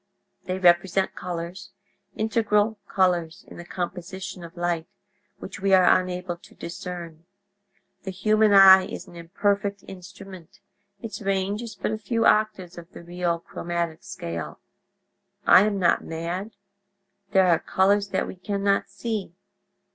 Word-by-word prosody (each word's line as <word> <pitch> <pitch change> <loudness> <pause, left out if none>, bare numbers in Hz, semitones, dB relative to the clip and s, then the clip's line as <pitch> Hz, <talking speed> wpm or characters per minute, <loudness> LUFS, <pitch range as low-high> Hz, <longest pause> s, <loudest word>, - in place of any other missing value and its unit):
They 185 0 -2
represent 185 +1 +3
colors—integral 205 +5 -3
colors 180 -2 0
in - - -12
the 175 - -8
composition 180 +1 -6
of 170 +1 -12
light—which 180 +4 -6
we 195 0 +4
are 185 0 +5
unable 180 -1 -5
to - - -19
discern. 170 -1 -8 0.8
The 190 - -7
human 215 +3 +2
eye 190 -1 +8
is - - -7
an - - -15
imperfect 200 +4 -1
instrument; 185 -2 -12 0.4
its 225 -1 -6
range 195 +1 -1
is 235 -2 -8
but - - -3
a 215 - -3
few 230 +2 -1
octaves 205 -5 +1
of 170 +1 -14
the - - -11
real 175 -1 -2
'chromatic 170 -1 -4
scale' 85 - -6 0.9
I 195 - +7
am 205 -2 -1
not 175 -3 +2
mad; 175 +6 -5 0.7
there 190 -1 +4
are 170 - +4
colors 200 +2 +2
that 190 - -1
we - - -9
can 200 +2 -4
not 200 0 +1
see. 205 -3 -5
190 Hz, 135 wpm, -25 LUFS, 175-200 Hz, 0.9 s, eye